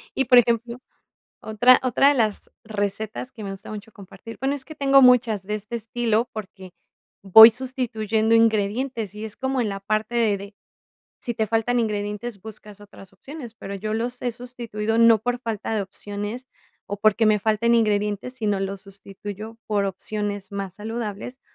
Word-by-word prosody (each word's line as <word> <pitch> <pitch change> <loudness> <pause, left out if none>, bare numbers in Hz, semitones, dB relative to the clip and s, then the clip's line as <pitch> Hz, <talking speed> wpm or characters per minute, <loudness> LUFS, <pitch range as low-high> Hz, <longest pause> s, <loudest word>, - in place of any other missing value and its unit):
Y, 270 - +1
por 250 +1 +6
ejemplo, 235 +1 +2 0.6
otra 245 +4 +4
otra 260 +2 +3
de 290 - +4
las 220 -5 -1
recetas 215 +3 -4
que 220 - -9
me 195 - -5
gusta 195 0 -9
mucho 215 +1 -8
compartir, 200 +3 -12
bueno, 270 +2 0
es 275 -2 -7
que 310 - -11
tengo 275 -2 +4
muchas 240 -5 +4
de 210 +2 -3
este 215 +3 -6
estilo, 230 +1 -1
porque, 190 -3 -9 0.5
voy 220 +4 +11
sustituyendo 225 -3 -1
ingredientes 225 0 +1
y 210 +1 -7
es 215 -1 -7
como 265 0 -1
en 215 - -2
la 195 0 -5
parte 215 +3 -2
de 225 -4 +2
de, 200 +1 -10 0.6
si 240 - -4
te 220 0 -1
faltan 230 +2 +1
ingredientes, 210 0 -3
buscas 210 -1 -11
otras 195 -2 -15
opciones, 245 - -10
pero, 200 -2 -8
yo 215 +2 -4
los 245 +2 -3
he 245 - -1
sustituido, 230 -2 -4
no 230 -1 +6
por 245 +3 -2
falta 225 -2 -3
de 210 - 0
opciones, 205 +5 -6 0.4
o 205 - -4
porque 215 +2 +3
me 215 0 +4
falten 220 +3 +1
ingredientes, 210 +1 0
sino 210 -5 -1
los 195 0 -4
sustituyo 205 +2 -8
por 205 -2 0
opciones 205 +1 -3
más 195 -2 -5
saludables, 225 +3 -6
220 Hz, 175 wpm, -23 LUFS, 205-240 Hz, 0.6 s, voy